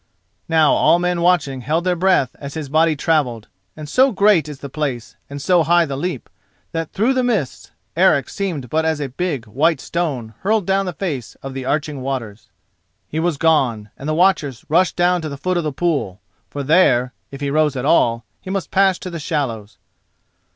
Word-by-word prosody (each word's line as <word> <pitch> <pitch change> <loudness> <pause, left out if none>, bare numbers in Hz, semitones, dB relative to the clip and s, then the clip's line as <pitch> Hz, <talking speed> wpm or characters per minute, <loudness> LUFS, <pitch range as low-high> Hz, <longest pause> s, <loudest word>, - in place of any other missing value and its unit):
Now 160 -2 +4
all - - +4
men 175 0 -1
watching 155 -7 +1
held 160 +6 0
their 180 0 +1
breath 180 -7 +2
as 140 -1 -8
his 155 -3 -5
body 160 +2 +3
travelled, 140 -8 0 0.3
and 155 -1 -7
so 260 - +3
great 200 - +3
is 150 - -7
the 140 - -7
place 135 -5 -4
and 140 0 -6
so 175 +4 +3
high 170 +2 +3
the 140 -3 -4
leap 150 -3 -4 0.4
that 165 -1 -4
through 230 +7 +1
the 260 - +1
mist 215 - -2 0.3
Eric - - +3
seemed 170 -10 -4
but 160 +1 +1
as 160 -1 0
a 140 -2 -3
big 145 -3 -3
white 140 +8 +1
stone 135 -11 -3
hurled 210 0 +1
down 195 +1 +1
the 180 - -3
face 150 - -4
of 135 0 -6
the 130 -1 -5
arching 145 0 -2
waters. 115 -5 -5 0.6
He 155 - -3
was 165 -2 0
gone, 130 -10 +1
and 140 - -6
the 155 - 0
watchers 155 -8 +1
rushed 175 +4 +3
down 175 0 +2
to 155 - -4
the 140 - -6
foot 185 +5 -1
of 175 - 0
the 155 - -2
pool, 135 - -1 0.3
for 145 +6 -5
there, 135 -5 +3 0.2
if 140 - -9
he 140 -1 -2
rose 150 -1 +2
at 130 0 -3
all, 115 -7 +2
he - - -10
must 195 -1 -3
pass 190 -1 +3
to 185 - -7
the 170 - -5
shallows. 125 -9 -3
155 Hz, 200 wpm, -19 LUFS, 135-175 Hz, 0.6 s, Now